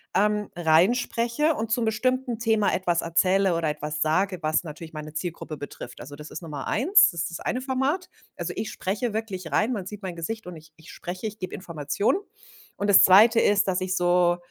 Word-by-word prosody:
ähm, 210 +1 +1
reinspreche 235 - +2
und 220 -3 -4
zum 235 0 +1
bestimmten 245 +2 0
Thema 220 -3 +2
etwas 175 -2 +1
erzähle 185 +2 +2
oder 165 -1 -1
etwas 150 0 -4
sage, 185 +4 +1
was 155 +1 +1
natürlich 160 0 -9
meine 155 0 -7
Zielgruppe 160 -1 -5
betrifft, 140 -3 -9
also, 140 +4 -9
das 150 +1 -10
ist - - -7
Nummer 145 -5 -6
1, 350 - +5
das 170 -2 -4
ist 170 - -4
das 170 - -6
eine 250 - -2
Format. 270 +7 -1 0.3
Also, - - -4
ich 220 - -4
spreche 205 +4 -3
wirklich 190 -7 -4
rein, 230 +4 +1
man 195 -6 -4
sieht 210 +1 -8
mein 180 -2 -5
Gesicht, 220 +7 -5
und 180 - -7
ich 155 0 -15
ich 160 -1 -14
spreche, 185 +5 -6
ich 215 0 -8
gebe 185 - -5
Information. 165 - -1 0.6
Und 205 - -1
das 195 - +8
zweite 220 +5 +7
ist, 205 -2 +3
dass 185 0 0
ich 185 0 -1
so 175 0 +3
185 Hz, 205 wpm, -25 LUFS, 165-220 Hz, 0.6 s, das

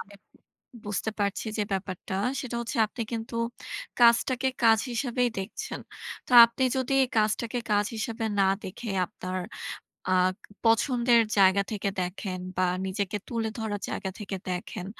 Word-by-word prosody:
আমি 200 - -11 0.7
বুঝতে 205 +1 -2
পারছি 200 +2 -1
যে 210 - +3
ব্যাপারটা 190 -1 -4 0.3
সেটা 240 -3 -4
হচ্ছে 235 +4 -4
আপনি 230 +3 -5
কিন্তু 225 +1 -4 0.7
কাজটাকে 240 +2 +5
কাজ 225 -1 +6
হিসেবেই 245 0 0
দেখছেন। 225 - -5 0.5
তা - - -6
আপনি 235 +3 -4
যদি 260 0 -1
এই 260 - +1
কাজটাকে 220 +3 0
কাজ 205 0 +3
হিসেবে 225 0 -3 0.2
না - - +5 0.2
দেখে 215 +4 -6 0.2
আপনার 185 +2 -5 0.8
আ - - +4 0.5
পছন্দের 235 +1 +4 0.2
জায়গা 195 0 +5
থেকে 200 -2 -1
দেখেন 185 +1 -4 0.2
বা 185 0 +3 0.2
নিজেকে 190 +1 -2
তুলে 230 -2 -1
ধরার 210 -2 -3
জায়গা 190 - -3
থেকে 200 -2 -4
দেখেন, 180 0 -4
220 Hz, 140 wpm, -27 LUFS, 195-235 Hz, 0.8 s, কাজ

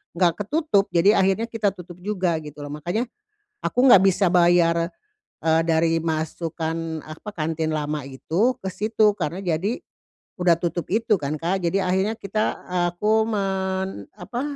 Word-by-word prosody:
nggak 175 +3 +2
ketutup. 295 -4 +1
Jadi 195 +5 +4
akhirnya 195 +4 +2
kita 220 -3 0
tutup 180 -2 -11
juga 185 -4 0
gitu 150 0 -10
loh. 145 0 -6
Makanya 175 - -2 0.6
aku - - -1
nggak 195 -7 +8
bisa 195 0 +3
bayar, 170 -1 +3 0.5
eee, 160 0 +3
dari 165 0 +2
masukan 160 0 -3
apa, 160 +7 -9
kantin 160 -1 -1
lama 150 0 -2
itu 170 - 0
ke 190 - -3
situ, 215 +1 +2
karena 175 +3 -3
jadi 185 +6 -1 0.5
udah 175 -3 +3
tutup 175 0 -3
itu 225 +2 +2
kan, 150 -4 -2
Kak. 180 +4 -1
Jadi 175 +3 +1
akhirnya 190 +4 0
kita 215 +2 -1 0.3
aku 215 +5 +2
men 190 - -2
apa, 235 +7 -4
180 Hz, 150 wpm, -23 LUFS, 165-205 Hz, 0.6 s, nggak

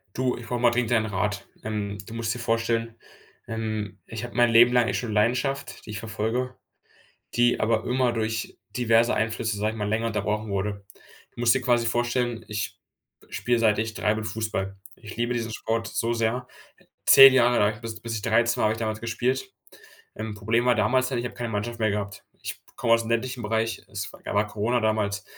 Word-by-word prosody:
Du, 130 0 0
ich 120 - -9
brauche 125 - -2
mal 120 0 +4
dringend 120 -1 0
deinen 110 -2 +3
Rat, 105 0 -2 0.2
ähm, 105 -2 -3
du - - -10
musst 115 -1 -1
dir - - -6
vorstellen, 115 0 0 0.5
ähm, 110 -4 -3
ich 115 0 -6
habe 120 - -11
mein 120 -1 +5
Leben 120 +2 +7
lang 120 -2 +4
echt - - 0
schon 115 -3 -4
Leidenschaft, 125 +6 0
die 105 - -8
ich 105 - -4
verfolge, 115 +3 -2 0.8
die 120 0 +3
aber 110 0 +1
immer 125 0 +2
durch 110 -1 -2
diverse 115 -1 +3
Einflüsse, 110 0 -1
sage 105 +1 0
ich 110 - -8
mal, 105 -1 -2
länger 110 +2 0
unterbrochen 105 -1 -2
wurde. 100 0 -2 0.5
Du - - -14
musst 120 0 +4
dir 135 - 0
quasi 120 -2 +2
vorstellen, 120 0 -1
ich 105 -1 -4 0.5
spiele, 120 +5 0
seit 110 -2 +3
ich 110 0 -2
3 105 - +1
bin, 110 0 -3
Fußball. 105 -3 -3 0.2
Ich 110 - -10
liebe 120 +1 0
diesen 115 -2 -2
Sport 115 +1 -2
so 115 +1 -1
sehr 115 +2 -1 0.6
10 135 -1 +10
Jahre 120 -1 +4
lang, 105 +1 +1
bis 115 -2 -6
bis 115 +1 -4
ich 105 - -3
13 115 +2 +2
war, - - +1
habe 110 - +3
ich 110 - -5
damals 110 -1 -2
gespielt. 125 +3 -1 0.6
Ähm, 110 0 -5
Problem 115 +3 +1
war 125 -1 +4
damals 130 +4 +2
dann, 130 -1 -2
ich 120 - -2
habe 120 - -5
keine 120 -1 -4
Mannschaft 115 +2 -3
mehr 110 -1 +2
gehabt. 100 0 -4 0.2
Ich - - -6 0.2
komme 115 -2 +2
aus 115 0 +3
dem 115 - -6
ländlichen 125 +2 -1
Bereich 110 +1 -1
es 100 -1 -5
da - - -3
war 105 +1 +2
Corona 110 +4 0
damals, 105 -3 0
115 Hz, 210 wpm, -26 LUFS, 110-120 Hz, 0.8 s, 10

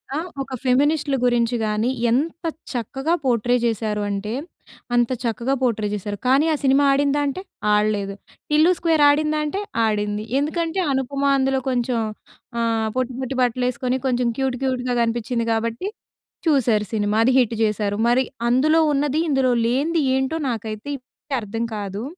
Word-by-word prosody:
ఆ! - - 0 0.2
ఒక 270 -1 -6
ఫెమినిస్ట్‌‌‌లు 280 +2 +2
గురించి 240 -1 +2
గాని, 215 +2 0 0.2
ఎంత 320 +7 -1 0.3
చక్కగా 270 +7 -2
పోర్ట్రే 245 -1 +2
చేశారు 215 -2 -1
అంటే, 200 +2 -3 0.6
అంత 240 -1 +3
చక్కగా 235 +3 -1
పోర్ట్రే 225 -4 +1
చేశారు. 205 0 -4
కానీ, 270 +4 +4
ఆ - - +2
సినిమా 270 +1 +4
ఆడిందా 285 +1 +2
అంటే, 280 +7 -3 0.3
ఆడలేదు. 210 -1 +1 0.4
'టిల్లు 310 +4 +5
స్క్వేర్' 325 -3 +2
ఆడిందా 305 +1 +2
అంటే 300 +6 -2 0.3
ఆడింది. 210 -1 -1 0.2
ఎందుకంటే, 330 +4 -1
అనుపమ 275 +1 -1
అందులో 265 0 +1
కొంచెం 245 -1 0 0.6
ఆహ్, 225 -1 +1
పొట్టి, 255 0 -1
పొట్టి 265 +1 -3
బట్టలు 250 0 +1
ఏసుకొని 250 +1 -1
కొంచెం 250 -1 +1
క్యూట్, 265 -1 0
క్యూట్‌గా 255 -1 -1
కనిపించింది 235 +1 -1
కాబట్టి 230 - -2 0.6
చూసారు 240 -8 +3
సినిమా. 210 -1 0
అది 255 - +4
హిట్ 235 -2 +1
చేశారు. 210 -1 0
మరి 245 +2 +4 0.3
అందులో 305 +6 +4
ఉన్నది, 290 +1 +1
ఇందులో 265 -3 +2
లేనిది 290 +8 +1
ఏంటో 265 +4 0
నాకైతే 220 +1 -5
ఇప్పటికీ 270 +2 -8
అర్థం 225 +2 -4
కాదు. 200 0 -4
250 Hz, 145 wpm, -22 LUFS, 225-275 Hz, 0.6 s, టిల్లు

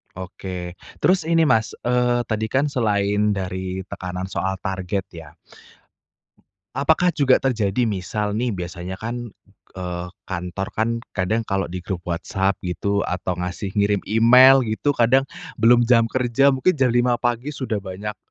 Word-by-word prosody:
Oke, 90 -1 -7 0.2
terus 185 -2 +3
ini 165 0 +3
Mas, 115 -8 +2
eee, 120 0 +1
tadi 110 -1 -1
kan 135 +6 0
selain 105 -5 +1
dari 95 -1 -4
tekanan 95 -1 -5
soal 95 0 -3
target 95 0 -3
ya. 80 -3 -12 1.4
Apakah 180 0 +2
juga 135 -3 +4
terjadi 115 -3 0
misal 105 0 -2
nih 120 +3 0
biasanya 90 -1 -5
kan, 120 +3 -5 0.5
eee, 90 -1 -4 0.2
kantor 90 +1 -4
kan, 110 +1 0 0.2
kadang 110 +4 -1
kalau 95 -4 -1
di 90 0 -7
grup 95 -3 -3
WhatsApp 95 +3 -1
gitu, 100 +3 -1
atau 90 0 -3
ngasih 90 +2 -4
ngirim 100 -1 +2
email 125 +4 +7
gitu 110 +6 -1
kadang, 130 -1 +4 0.4
belum 120 +1 +6
jam 115 -1 +4
kerja 130 +2 +2
mungkin 135 +7 +2
jam 135 -4 +2
5 120 +1 +2
pagi 120 +4 -1
sudah 130 -5 -3
banyak, 100 +2 -6
105 Hz, 145 wpm, -22 LUFS, 95-120 Hz, 1.4 s, email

